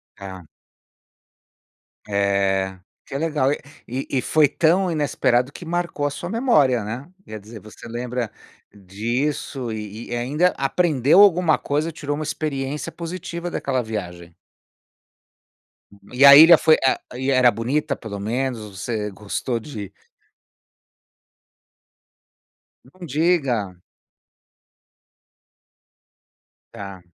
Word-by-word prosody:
Tá. 95 -4 -10 1.6
É, 100 -2 0 0.3
que 135 - -6
legal. 150 -4 0 0.4
E 130 +3 -4
e 130 - 0
foi 155 +2 +3
tão 175 +5 +2
inesperado 135 -4 +1
que 175 - -10
marcou 170 -3 -2
a - - -1
sua 175 +5 -6
memória, 150 - +2
né, 120 +8 -6 0.2
quer 110 0 -8
dizer, 110 +1 -12
você 110 +2 -13
lembra 120 -1 -4 0.4
disso 120 +6 -3
e 105 +1 -7
e - - -3
ainda 145 +9 +1
aprendeu 145 +2 +3
alguma 180 -5 +5
coisa, 150 +3 -1
tirou 145 -1 -4
uma 155 - -4
experiência 145 -2 -4
positiva 170 0 -6
daquela 130 -6 -2
viagem. 90 -6 -7 1.8
E 130 +3 +3
a 140 0 +11
ilha 165 +2 +9
foi 155 -1 +5
a 130 - +3 0.2
e 130 +2 -1
era 130 -2 +5
bonita, 140 +6 -2
pelo 100 -4 -7
menos? 125 +4 -2 0.2
Você 105 0 -3
gostou 105 +5 -3
de 105 -6 -8 2.9
Não 175 +7 -12
diga! 135 - 0 2.9
Tá. 100 -2 -9
130 Hz, 105 wpm, -22 LUFS, 110-155 Hz, 2.9 s, a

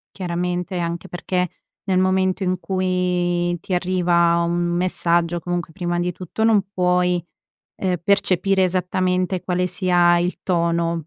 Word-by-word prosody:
Chiaramente, 180 0 -2
anche 170 0 -3
perché 180 +1 -2 0.4
nel 190 -2 +1
momento 185 0 +1
in 185 -1 0
cui 180 -2 0
ti 185 - -3
arriva 175 -2 +2
un 170 0 -1 0.2
messaggio, 175 -1 +1
comunque 175 -1 -4
prima 175 -1 -2
di 175 +1 0
tutto 180 +5 -6
non 220 -2 +4
puoi, 180 -2 +1 0.6
ehm, 185 -2 0
percepire 195 0 +2
esattamente 185 0 0
quale 180 0 0
sia 175 -2 +3
il 175 +1 -1
tono, 170 -2 0
180 Hz, 130 wpm, -21 LUFS, 175-185 Hz, 0.6 s, non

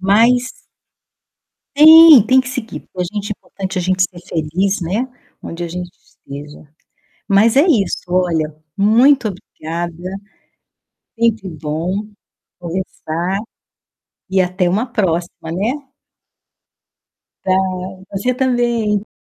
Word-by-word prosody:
Mas 235 +6 +3 1.2
Tem, 315 -2 +9
tem 260 +1 +5
que 255 - -6
seguir. 255 -4 -6
Pra 185 - -3
gente 205 -1 -4
é - - +1
importante 190 -1 -6
a - - 0
gente 185 +1 +1
ser 180 -1 -3
feliz, 180 +6 -1
né, 200 +10 -2 0.3
onde 170 +1 -7
a - - -5
gente 180 +1 -6
esteja. 145 +2 -12 0.6
Mas 210 +4 +4
é 280 - +6
isso, 235 - +1
olha, 170 -4 0 0.2
muito 235 +5 +4
obrigada, 170 -1 -6 1.1
é - - -15
sempre 220 -5 0
bom 165 +6 -4 0.5
conversar 175 +1 -4 0.9
e 190 - +2
até 180 0 +1
uma 210 +7 0
próxima, 175 -7 -2
né. 205 +8 -1 1.7
Pra 185 - +1 0.6
você 200 +6 -1
também. 240 -5 0
195 Hz, 110 wpm, -17 LUFS, 175-230 Hz, 1.7 s, Tem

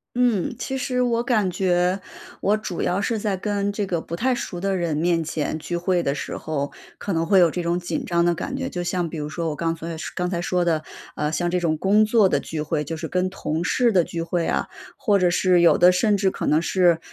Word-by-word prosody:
嗯， 240 -3 +1
其 265 +1 -3
实 250 -1 -1
我 235 -1 +1
感 215 -7 +1
觉 180 +1 +1 0.4
我 210 +2 +2
主 190 -5 -5
要 180 +3 0
是 220 +2 -1
在 200 -3 -1
跟 205 0 -1
这 205 0 -2
个 170 -3 -2
不 170 - -6
太 255 +6 +1
熟 185 -7 -4
的 195 +1 0
人 170 -4 -1
面 165 0 +1
前 155 0 -3
聚 175 +2 -3
会 175 0 +1
的 140 -2 -1
时 - - -5
候， 145 -2 -3 0.3
可 200 - -3
能 165 0 0
会 190 +2 +5
有 170 -3 +5
这 180 - -3
种 170 +1 0
紧 175 - -3
张 170 -1 +1
的 175 - +3
感 265 - -4
觉。 265 -1 -3
就 175 -6 -4
像 175 -1 -1
比 160 - -6
如 150 0 -4
说 165 0 -3
我 150 - -3
刚 165 +2 -1
才 165 0 -6 0.2
刚 180 -1 -1
才 175 -1 -2
说 180 0 0
的， 160 -2 +1 0.3
啊， 150 0 -1
像 175 +3 -1
这 180 - +1
种 160 -2 0
工 205 +5 +4
作 215 -2 +4
的 - - +1
聚 155 -2 -5
会， 150 0 -1
就 160 +2 -5
是 160 0 -4
跟 185 +3 0
同 165 -3 -3
事 240 +5 +2
的 180 -4 +4
聚 165 0 -4
会 170 0 -1
啊， - - 0 0.3
或 205 -4 +2
者 180 -1 +3
是 180 0 +3
有 170 - +5
的 180 +1 +7
甚 205 +3 +2
至 190 -1 +1
可 - - -4
能 155 - +4
是， 175 -3 +3
180 Hz, 270 characters per minute, -23 LUFS, 165-200 Hz, 0.4 s, 的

